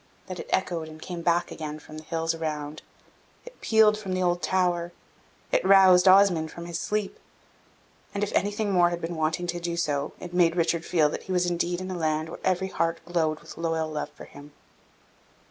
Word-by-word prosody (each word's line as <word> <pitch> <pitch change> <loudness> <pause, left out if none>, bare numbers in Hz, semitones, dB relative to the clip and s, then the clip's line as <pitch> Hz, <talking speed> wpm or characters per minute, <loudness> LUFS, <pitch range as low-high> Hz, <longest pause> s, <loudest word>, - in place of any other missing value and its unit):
that 185 -1 -7
it - - -8
echoed 170 -4 -1
and 155 0 -11
came 175 +1 -6
back 170 +1 +1
again 155 -1 -5
from 155 0 -11
the - - -12
hills 165 0 -1
around 155 -2 -4 0.6
it - - -13
pealed 220 -1 +5
from 205 -3 -5
the 185 - 0
old 175 0 +1
tower 175 -2 0 0.6
it - - +2
roused 190 -1 +6
Osmond 185 -4 +5
from 170 +1 -9
his 170 -1 -4
sleep 210 -2 -2 0.9
and, 200 - -2
if 210 - -2
anything 205 +1 0
more 175 -2 +4
had 175 0 -3
been 170 +1 -4
wanting 160 +2 -1
to 175 0 -3
do 170 0 -3
so, 145 -3 -1
it 175 -1 -8
made 170 -2 +3
Richard 170 -1 0
feel 160 -4 +3
that - - -5
he 190 - -6
was 180 -1 +2
indeed 175 0 -1
in 185 0 -5
a - - -3
land 155 -1 -1
where - - -8
every 190 0 0
heart 165 -2 -1
glowed 160 -3 0
with - - -12
loyal 165 -1 -1
love 150 - -3
for - - -11
him. 145 +1 -14
175 Hz, 205 wpm, -26 LUFS, 160-185 Hz, 0.9 s, roused